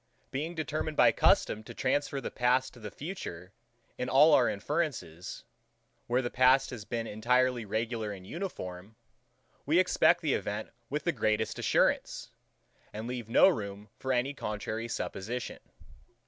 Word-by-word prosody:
Being 155 +6 -3
determined 155 -1 -3
by - - +7
custom 105 - +3
to - - -10
transfer 140 +1 0
the - - -5
past 125 +1 +1
to 120 - -14
the 105 -2 -6
future, 100 - -7 0.5
in 125 0 -2
all 150 +4 +6
our 125 - +5
inferences; 105 - -3 0.6
where 125 +2 +1
the 120 - -3
past 130 +2 +4
has 115 -5 -7
been 115 +1 -3
entirely 120 +2 +1
regular 110 +1 -2
and 95 -2 -9
uniform, 100 - -6 0.7
we 155 +4 +2
expect 180 -1 +4
the 150 -5 +1
event 105 +1 -3 0.2
with 150 +1 -2
the 170 - +2
greatest 110 -5 0
assurance, - - +1 0.6
and 110 +2 -6
leave 120 -2 -5
no 120 - +7
room 105 - -2
for 130 - -2
any 130 +2 +1
contrary 110 -2 -4
supposition. 120 +1 -4
125 Hz, 145 wpm, -30 LUFS, 105-140 Hz, 0.7 s, by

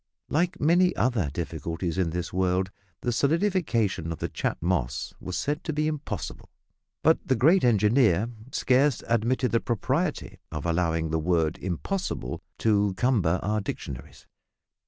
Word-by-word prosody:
Like 175 +3 0
many 175 +4 +4
other 110 - +1
difficulties 85 +4 -3
in 90 -3 +2
this 85 +1 -4
world, 95 +1 +1 0.3
the 120 - 0
solidification 140 - +1
of 80 - -4
the - - -3
Chat - - -2
Moss 80 -9 -1
was 90 -1 -4
said 150 +2 -2
to 160 - -1
be 150 +1 0
impossible, 115 - -5 0.5
but 160 +1 +5
the 130 - +1
great 160 - +4
engineer 110 -3 +4 0.2
scarce 130 +1 +2
admitted 120 +3 +1
the 115 - +3
propriety 130 - -1
of 75 - -5
allowing 80 -2 0
the 80 - +1
word 80 -1 +1
"impossible" 95 - -3 0.2
to 105 -3 +2
cumber 95 -8 +2
our 105 +2 0
dictionaries. 70 -9 -7
105 Hz, 140 wpm, -27 LUFS, 85-140 Hz, 0.5 s, but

